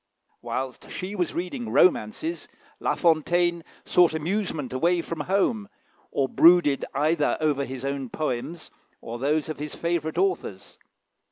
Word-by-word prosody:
Whilst 130 -1 -5
she 185 +2 -5
was 180 -5 -2
reading 220 +7 -4
romances, 270 - +2 0.3
La - - 0
Fontaine 170 +1 +2 0.2
sought 175 -3 +4
amusement 160 -5 -2
away 170 +7 +2
from 165 -1 -5
home, 200 - 0 0.4
or 135 - 0
brooded 165 -2 +5
either 150 +1 +1
over 150 -3 +1
his 130 0 -6
own 140 -2 -3
poems 155 +4 -4 0.3
or 115 +1 -7
those 150 +3 0
of 155 - -5
his 150 0 -5
favourite 170 -2 -2
authors. 180 - -2
160 Hz, 135 wpm, -25 LUFS, 140-180 Hz, 0.4 s, brooded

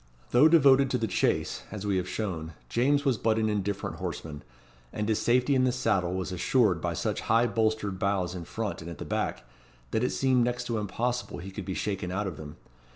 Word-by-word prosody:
Though 130 +6 +7
devoted 140 -4 +6
to 125 - +1
the 115 - -1
chase, 105 - 0
as 105 -2 -6
we 100 -2 +1
have 90 0 -2
shown, 85 -7 -4 0.2
James 140 +4 +2
was 130 -5 +2
but 110 -1 +2
an 110 -1 +1
indifferent 100 -1 -2
horseman; 75 -2 -5 0.5
and 105 0 -3
his 110 -1 +1
safety 125 +3 +3
in 130 -1 +3
the 130 - +3
saddle 95 -8 0
was 95 0 -3
assured 90 0 +2
by - - -2
such - - -2
high 115 +2 +5
bolstered 110 -4 0
bows 95 -3 0
in 90 -2 -6
front 110 -1 -4
and 80 - -7
at 85 - -8
the - - -6
back, 65 - -2 0.5
that 110 - 0
it 125 - +2
seemed 130 -2 +2
next 125 +1 -1
to 115 -2 -2
impossible 120 +5 -2
he 95 +3 -8
could 95 0 -6
be 95 - -3
shaken 95 -3 -2
out 100 +3 -1
of 95 -4 -4
them. 75 -1 -9
105 Hz, 220 wpm, -28 LUFS, 95-125 Hz, 0.5 s, Though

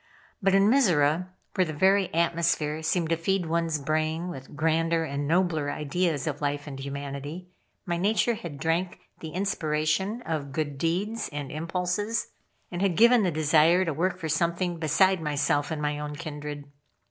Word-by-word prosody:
But 195 0 +3
in 195 +1 +5
Mizora, 180 - +3 0.3
where 185 - +3
the 155 - -5
very 190 +4 +3
atmosphere 165 -2 +1
seemed 165 +1 0
to 165 - +3
feed 185 +2 0
one's 165 -1 0
brain 155 +4 -1
with 135 -4 -9
grander 165 +2 +1
and 145 -2 -3
nobler 165 -3 +1
ideas 150 0 -1
of 150 -2 -3
life 145 0 -1
and 140 -3 -7
humanity, 140 +5 -6 0.4
my 175 -1 -1
nature 215 +6 +2
had 170 -9 -7
drank 165 +5 -1 0.2
the 160 - -6
inspiration 180 +4 -1
of 145 -4 -3
good 145 -2 -3
deeds 200 +8 -1
and 145 -2 -5
impulses, 180 +7 -2 0.4
and 175 0 -4
had 195 -4 +1
given 235 +1 +6
the 190 - +2
desire 155 +3 +4
to 165 - -1
work 180 +4 0
for 165 -3 -4
something 170 +2 0
beside 175 +4 +3
myself 145 -1 0
and 155 -2 -3
my 150 0 -1
own 150 0 -5
kindred. 145 -1 -6
165 Hz, 165 wpm, -27 LUFS, 150-180 Hz, 0.4 s, given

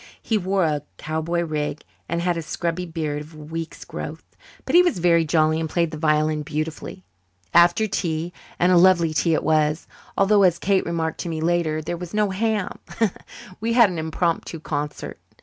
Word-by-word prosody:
He 225 - -1
wore 195 -1 +1
a 150 -2 0 0.2
cowboy 160 +2 -2
rig 155 -2 -3 0.3
and 170 0 -1
had 175 -1 +1
a 165 - -3
scrubby 170 +2 -3
beard 155 -3 -3
of 155 +2 -12
a - - -12
week's 160 +2 -7
growth. - - -8 0.3
But - - -3
he 350 - +8
was 350 - +1
very 170 -1 +3
jolly 155 0 +2
and 160 -1 -2
played 170 0 0
the 155 - -6
violin 155 0 +2
beautifully. 150 - -5 0.5
After 175 +5 +5
tea 170 -4 -2 0.2
and 180 +1 +3
a 180 - +6
lovely 170 -3 +5
tea 160 +2 +2
it - - -1
was, 155 0 +1 0.3
although, 200 +1 +4
as 180 -3 +4
Kate 195 -1 +1
remarked 165 -2 -2
to 175 - -4
me 160 -1 -3
later, 160 -1 0
there 175 +3 -3
was 180 +3 -7
no 210 -2 +2
ham 210 0 -1 0.8
we 230 +2 -1
had 230 -5 +6
an 170 - -4
impromptu 165 +1 -2
concert. 150 -1 -5 0.2
Mr. - - -45
165 Hz, 190 wpm, -23 LUFS, 155-180 Hz, 0.8 s, he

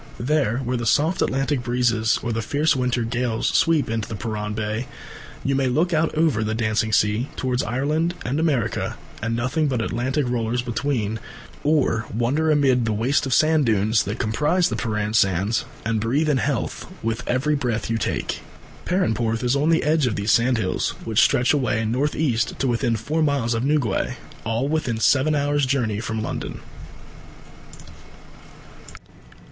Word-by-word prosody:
There, 130 -3 +1
where 125 -1 -2
the 120 -1 -3
soft 160 +8 +2
Atlantic 135 0 0
breezes 120 -1 +1
or 120 - -2
the 115 - -1
fierce 145 +7 +1
winter 125 -2 0
gales 115 -1 -1
sweep 165 -3 +2
in 115 0 -1
to 110 - -6
Perran 105 0 -4
Bay, 110 +3 -3 0.6
you 140 - 0
may 135 -1 +1
look 160 +8 +1
out 160 0 +1
over 155 -9 +2
the 110 +1 -1
dancing 110 -1 0
sea 105 +5 +2
towards 130 -1 -1
Ireland 150 +8 -1
and 135 +5 -1
America 135 -10 0 0.2
with 115 +1 -2
nothing 130 +7 0
but 130 -4 -1
Atlantic 130 +5 -1
rollers 120 0 -1
between, 120 -3 -2 0.4
or 140 -7 +1
wander 130 +9 0
amid 135 -5 +3
the 110 - 0
waste 130 +6 +1
of 130 - 0
sand 155 -3 +3
dunes 110 0 +2
that 100 +3 -3
comprise 150 +12 +1
the - - -2
Perran 105 -1 -2
Sands 100 +1 +2 0.2
and 110 -1 0
breathe 140 +8 +1
in 140 - +2
health 135 -5 -2
with 115 +1 -1
every 135 +5 +1
breath 120 -6 -1
you 115 - 0
take. - - -2 0.4
Perranporth 115 - 0
is 125 +2 +2
on 145 +3 +2
the 165 - +3
edge 150 -2 +2
of 110 - -1
these 100 +1 0
sandhills, 115 -5 +1
which 110 -1 +3
stretch 125 +4 +3
away 115 -6 0
north 130 +7 0
east 120 -7 0
to 135 - 0
within 120 -1 +1
four 145 +9 -2
miles 140 -6 +1
of 115 +1 -1
Newquay 140 -8 0 0.3
all 115 +4 0
within 150 -7 -1
seven 140 +6 +3
hours' 145 -1 +1
journey 120 -6 0
from 110 -1 -3
London. - - -5
120 Hz, 165 wpm, -23 LUFS, 110-145 Hz, 0.6 s, amid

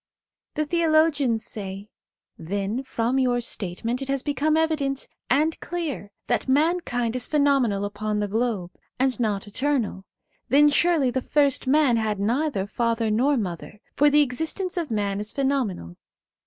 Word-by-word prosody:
The 305 - 0
theologians 310 -7 +2
say: 195 -1 -6 0.3
* - - -61
Then 205 +5 -1
from 260 -1 -1
your 250 -2 +2
statement 230 +2 -3
it 270 - -4
has 275 -1 -1
become 295 +2 +1
evident 300 -4 0 0.2
and 305 +5 +2
clear 310 - -4
that 240 - -1
mankind 270 -5 +1
is 250 -1 -2
pheno 285 -3 +3
menal 200 -3 -1
upon 210 +1 -3
the 205 - -1
globe, 215 -4 -1 0.3
and 260 -1 +1
not 210 -4 -1
eternal. 230 -4 -1 0.4
Then 295 +2 +6
surely 295 -3 +3
the 260 - -1
first 280 -1 +1
man 275 -3 +4
had 215 -2 -1
neither 235 0 0
father 230 +1 0
nor 265 +6 +2
mother, 195 0 -5 0.2
for 295 +1 +5
the 295 +1 +5
existence 320 +8 -3
of 340 -4 -2
man 205 -3 -1
is 210 +1 -4
phenomenal. 255 - -2
255 Hz, 155 wpm, -24 LUFS, 215-290 Hz, 0.4 s, Then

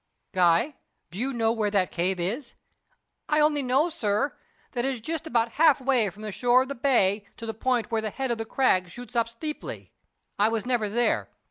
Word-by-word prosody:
"Guy, 180 - +3 0.3
do 185 - -7
you 265 +3 0
know 225 -3 +1
where 220 -2 0
that 195 -3 +1
cave 180 +2 -1
is?" 235 +9 -3 0.7
"I 300 - +3
only 300 -1 +3
know, 265 +5 +2
sir, 215 -4 -1 0.4
that 240 -2 -2
it 270 0 0
is - - -8
just 320 +7 -4
about 235 -4 +1
half 310 -4 +6
way 255 -5 +2
from 210 +3 -13
the 215 - -4
shore 245 +4 +3
of 265 - -10
the - - -2
bay 215 -6 +2
to 230 - -7
the 225 - -3
point 245 +1 0
where 225 -1 +1
the 215 - -2
head 265 +3 -3
of 235 - -2
the - - -1
Crag 185 -8 +2
shoots 245 +7 -10
up 230 -1 +2
steeply. 300 +6 -6 0.5
I 210 +2 +4
was 225 -1 -2
never 240 -4 0
there. 240 +3 +1
235 Hz, 215 wpm, -26 LUFS, 210-265 Hz, 0.7 s, half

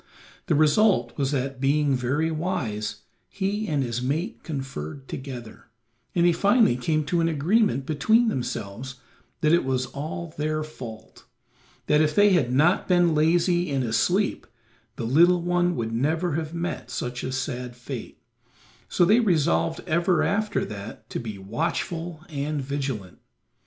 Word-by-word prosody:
The - - +2
result 150 - +3
was 135 -2 0
that, 135 -1 -2
being 145 +1 +2
very 140 +6 0
wise, 135 - -3 0.3
he 205 +2 -2
and 145 -4 0
his 120 -1 -3
mate 145 +8 -2
conferred 135 - -6
together, 125 -4 -8 0.5
and 170 -1 +4
they 175 - +6
finally 205 - +4
came 155 +5 0
to 170 +3 0
an 165 - +2
agreement 165 - +2
between 220 - +3
themselves 125 - -4 0.5
that 155 +1 +3
it 170 - +4
was 130 -1 0
all 155 +3 -6
their 155 +1 0
fault; 120 -8 -10 0.6
that 150 +1 +4
if 155 -1 +1
they 205 0 +6
had 145 -10 +2
not 155 +8 +3
been 175 -2 +4
lazy 175 +3 +2
and 135 -2 0
asleep 175 - +1 0.5
the 115 - -4
little 170 +8 +4
one 175 0 +1
would 115 -1 -3
never 160 +8 0
have 155 +1 -2
met 170 +1 -4
such 120 0 -4
a 130 - -3
sad 125 -2 -4
fate, 125 0 -7 0.7
so 175 - +3
they 215 +7 +5
resolved 165 -5 +1
ever 170 +2 +2
after 210 +1 0
that 105 +1 -8
to - - -2
be 110 -4 -6
watchful 165 - -3
and 150 -1 -3
vigilant. 135 -9 -4
150 Hz, 150 wpm, -25 LUFS, 130-175 Hz, 0.7 s, they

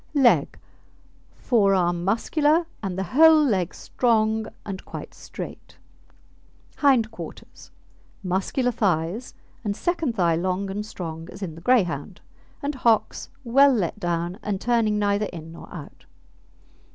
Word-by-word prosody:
Leg 270 -4 +4 0.8
Forearm 190 -7 +2
muscular 295 - +2 0.2
and 190 -3 -4
the 190 - -1
whole 315 +2 +7
leg 185 -8 +1
strong 220 -2 0 0.2
and 195 -2 -6
quite - - -8
straight. - - -9 1.0
HIND 255 -6 +3
QUARTERS 225 - -10 0.5
Muscular 195 +7 0
thighs, 200 +1 -1 0.3
and 205 -2 -2
second 330 - -1
thigh 170 -5 +2
long 185 +3 -1
and 205 +2 -3
strong 165 -4 -7
as 200 - -8
in 170 -4 -4
the 165 - -12
Greyhound, 205 -5 +1 0.4
and 285 +1 -1
hocks 235 -4 +1
well 275 +3 +5
let 205 -1 -1
down 175 0 -2
and 200 -2 -2
turning 230 -3 +1
neither 205 0 +1
in 165 -3 -9
nor 165 - -12
out. 155 -5 -10
210 Hz, 125 wpm, -24 LUFS, 180-245 Hz, 1.0 s, whole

